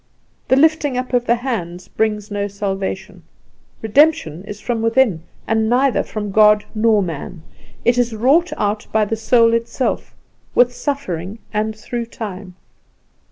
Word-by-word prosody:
The 260 - +4
lifting 295 -2 +3
up 255 0 -4
of 245 -1 +1
the 235 - +4
hands 185 -8 -4
brings 210 -1 -2
no 205 0 -1
salvation; 195 -1 -4 0.6
redemption 220 - +2
is 210 0 -8
from 235 -1 -2
within, 230 -6 +2 0.2
and 220 0 +1
neither 255 +2 +3
from 210 -2 -5
God 210 0 +5
nor 215 -2 +3
man; 165 0 -6 0.4
it 240 +1 +3
is 240 -2 0
wrought 290 +11 +3
out 210 +1 -1
by 215 -1 +2
the 225 - -2
soul 230 +1 +3
itself, 230 +3 -2 0.4
with 245 0 +4
suffering 225 - -4 0.2
and 215 +1 -1
through 235 +2 -5
time. 195 -5 -8
220 Hz, 145 wpm, -19 LUFS, 205-245 Hz, 0.6 s, God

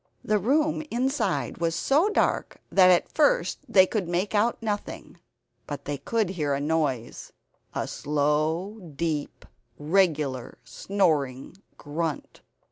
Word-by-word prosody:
The 210 0 +1
room 300 +9 +1
inside 240 - -1
was 165 -1 0
so 300 - +2
dark 425 - 0
that 185 -2 +6
at 180 -1 +3
first - - +2
they 190 -2 +6
could 195 -2 -2
make 180 +4 -1
out 215 +3 +2
nothing; 210 -2 -5 0.5
but 145 -1 -6
they 145 -1 -3
could 220 +5 0
hear 150 -6 -1
a - - -2
noise 145 -6 -2 0.4
a - - -2
slow 155 +7 -1 0.2
deep 155 -1 -3 0.3
regular 150 -6 0
snoring 155 -8 -1 0.2
grunt. 155 +1 -4
170 Hz, 125 wpm, -26 LUFS, 145-210 Hz, 0.5 s, that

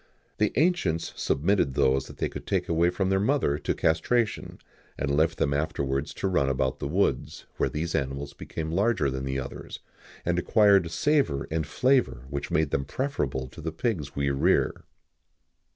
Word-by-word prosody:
The 105 - +3
ancients 95 - +1
submitted 75 -3 +1
those 65 0 +2
they - - -3
could - - -9
take - - 0
away 85 +1 +3
from 95 +2 -1
their 95 - +3
mother 105 - +1
to - - -1
castration, 105 +1 0 0.4
and 70 - 0
left 80 +3 +2
them 70 - +1
afterwards 70 -1 -1
to - - -1
run 70 -8 +2
about 65 -1 0
the - - -3
woods, 75 -4 -1
where - - +1
these 80 +3 -3
animals 70 +1 -2
became 80 -1 -5
larger 95 - +1
than 65 0 -4
the 65 0 -2
others, 65 0 -6 0.5
and 90 0 +1
acquired 100 -2 +4
a - - -7
savour 135 - +1
and 80 -2 -1
flavour 125 - +1
which 70 -1 -3
made 80 -2 +1
them 70 - 0
preferable 70 - -2
to 80 - -11
the 80 +1 -3
pigs 80 - -2
we 70 -1 +1
rear." 70 - +1
80 Hz, 170 wpm, -27 LUFS, 70-100 Hz, 0.5 s, acquired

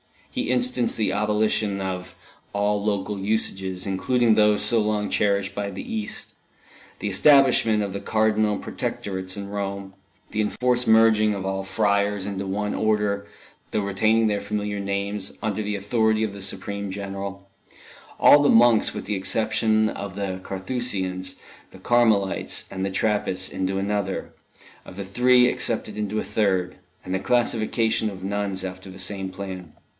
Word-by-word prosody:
He - - -2
instanced 125 -1 +1
the 110 - +1
abolition 105 0 +1
of 90 -1 -4 0.4
all 105 0 +1
local 100 -1 -1
usages, 95 -3 -1
including 115 +5 +2
those 105 -1 +4
so 115 - +3
long 105 -1 0
cherished 100 -1 +1
by 100 0 -3
the 95 - -6
East, 110 -1 -5 0.7
the 105 - -2
establishment 120 -1 +5
of 100 -2 -4
the 100 - -3
Cardinal 110 0 +1
Protectorates 95 -1 -4
in 100 0 -6
Rome, 100 -1 -4 0.4
the 110 - -3
enforced 125 +3 0
merging 110 -1 +5
of 95 -1 -5
all 95 0 -2
friars 100 0 +1
into 100 -1 -4
one 105 +2 -2
Order, 105 -2 0 0.4
though 105 - 0
retaining 110 +3 +2
their 105 -2 +1
familiar 105 -1 -3
names, 100 0 -3
under 110 -1 -1
the 105 0 -2
authority 110 +2 +1
of 105 -2 -2
the 100 - -9
supreme 100 +1 -5
General; 100 0 -6 0.7
all 145 0 +7
monks, 115 -2 +5
with - - -5
the 105 - -1
exception 110 +2 +1
of 100 -2 -6
the 95 -2 -3
Carthusians, 95 -2 -3 0.4
the - - -13
Carmelites 110 -3 +2
and 95 0 -3
the - - -1
Trappists, 95 -2 0
into 95 +1 -2
another; 100 0 -2 0.5
of - - -11
the 100 0 -5
three 125 +5 +4
excepted 110 -3 -1
into 105 0 -2
a - - -2
third; 95 -4 0 0.3
and 95 - -5
the 95 - +1
classification 115 -1 +1
of 95 -2 -9
nuns 100 -1 -2
after 95 0 -7
the 95 - -10
same 95 0 -4
plan. 95 -3 -7
100 Hz, 150 wpm, -24 LUFS, 95-110 Hz, 0.7 s, all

